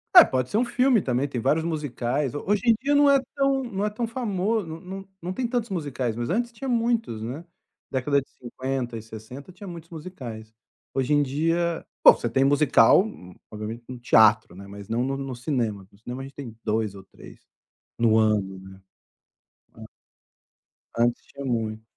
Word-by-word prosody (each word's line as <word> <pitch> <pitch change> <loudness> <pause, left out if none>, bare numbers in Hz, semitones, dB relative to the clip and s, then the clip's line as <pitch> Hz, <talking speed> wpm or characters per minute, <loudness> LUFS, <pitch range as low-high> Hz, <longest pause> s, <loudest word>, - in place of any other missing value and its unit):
É, - - +13
pode 130 -1 -1
ser 210 - +1
um 245 - +3
filme 250 -2 +3
também, 130 0 0
tem 125 -4 -4
vários 160 +7 +2
musicais. 145 -4 -2
Hoje 200 +6 0
em 230 - +7
dia 280 +3 0
não 285 0 +6
é 275 -1 +6 0.2
tão 275 -1 +2
não 205 -5 -3
é 210 - +1
tão 215 +3 -3
famoso, 220 -4 -1
não 160 0 -7
não 195 +1 -8
não 180 +2 -4
tem 245 +3 -1
tantos 235 -3 -2
musicais, 135 -9 -2
mas 120 0 -3
antes 235 +6 0
tinha 255 +3 -6
muitos, 230 - 0
né. 130 +8 -5 0.5
Década 140 +2 +1
de - - -17
50 130 -1 -4
e 110 - -5
60 110 - -10
tinha 200 +2 -11
muitos 170 -2 -9
musicais. 130 -10 -8 0.4
Hoje 135 +2 +1
em 145 0 +4
dia, 165 +4 0 0.2
pô - - +11
você 120 - -3
tem 135 +4 +2
musical, 145 +1 +5 0.5
obviamente 110 +2 -6
no 130 - -6
teatro, 110 -5 +4
né, 100 +1 -10
mas 100 0 -10
não 115 +2 0
no 135 +1 -1
no 135 -2 -5
cinema, 115 -8 -2
no 100 - -21
cinema 125 +4 -7
a - - -6
gente 135 - -13
tem 125 -6 -8
2 110 -2 0
ou 95 -1 -11
3, - - -15 0.6
no 115 -2 +4
ano, 105 -3 +1
né, 95 0 -12 1.0
an - - -11 1.1
antes 120 +1 +1
tinha 140 0 -8
muito. 110 -3 -2
135 Hz, 190 wpm, -25 LUFS, 115-190 Hz, 1.1 s, É